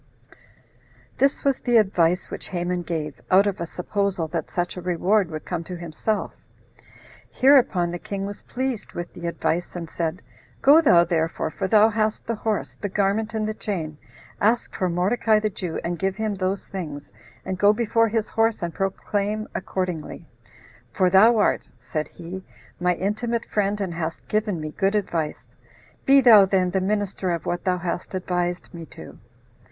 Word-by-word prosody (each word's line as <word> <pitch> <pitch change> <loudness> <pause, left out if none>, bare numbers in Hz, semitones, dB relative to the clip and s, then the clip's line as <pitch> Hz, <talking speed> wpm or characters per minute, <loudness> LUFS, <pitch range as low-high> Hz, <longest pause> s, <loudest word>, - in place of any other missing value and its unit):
This 275 +2 +2
was 275 -2 +2
the 240 -2 +3
advice 180 -4 +2
which - - -6
Haman 180 0 -2
gave, 160 -4 -4
out 190 +2 +6
of 200 -2 -2
a 170 - -2
supposal 190 -1 -2
that 165 -1 -3
such 175 -1 -2
a 180 - -6
reward 180 +2 +1
would 155 -1 -6
come 175 -2 -3
to 180 - -6
himself. 170 +5 -3 1.0
Hereupon 245 -10 +4
the 175 - -4
king 195 +1 -4
was 205 +1 -7
pleased 255 -3 -4
with 175 0 -6
the 170 - -6
advice, 170 +1 -2
and 170 -2 -5
said, 165 +2 -3 0.4
"Go 295 +4 +8
thou 175 - +6
therefore, 165 -2 -1
for 190 - -3
thou 215 +2 +6
hast 215 0 -1
the 230 - -1
horse, 220 -1 -2
the 205 - -5
garment, 210 +3 0
and 215 -1 0
the 215 - -2
chain, 160 -9 -4 0.4
ask 225 +3 +2
for 185 - 0
Mordecai 210 +5 +2
the 215 0 -1
Jew, 180 -3 -4
and 175 0 -3
give 195 0 0
him 215 0 -1
those 190 0 -2
things, 150 - -7 0.3
and 190 -1 -3
go 205 +1 +6
before 230 +1 +2
his 220 -1 -1
horse 225 -3 +1
and 170 -1 -3
proclaim 205 +2 -2
accordingly; 180 -3 -4 0.7
for 180 +7 +2
thou 220 +5 +6
art," 210 - +1
said 155 -3 -3
he, 180 +2 -8 0.4
"my 180 0 +2
intimate 225 +5 -2
friend, 205 0 0
and 190 -4 -2
hast 165 -1 -5
given 210 -4 0
me 155 0 -5
good 195 +5 0
advice; 165 -7 -2 0.6
be 275 0 +7
thou 225 -5 +9
then 185 -2 +1
the 190 - 0
minister 200 -1 -1
of 170 -2 -2
what 175 - -2
thou 180 -1 +2
hast 175 +1 -4
advised 180 -1 -2
me 165 -2 -8
to. - - -12
190 Hz, 175 wpm, -24 LUFS, 175-215 Hz, 1.0 s, thou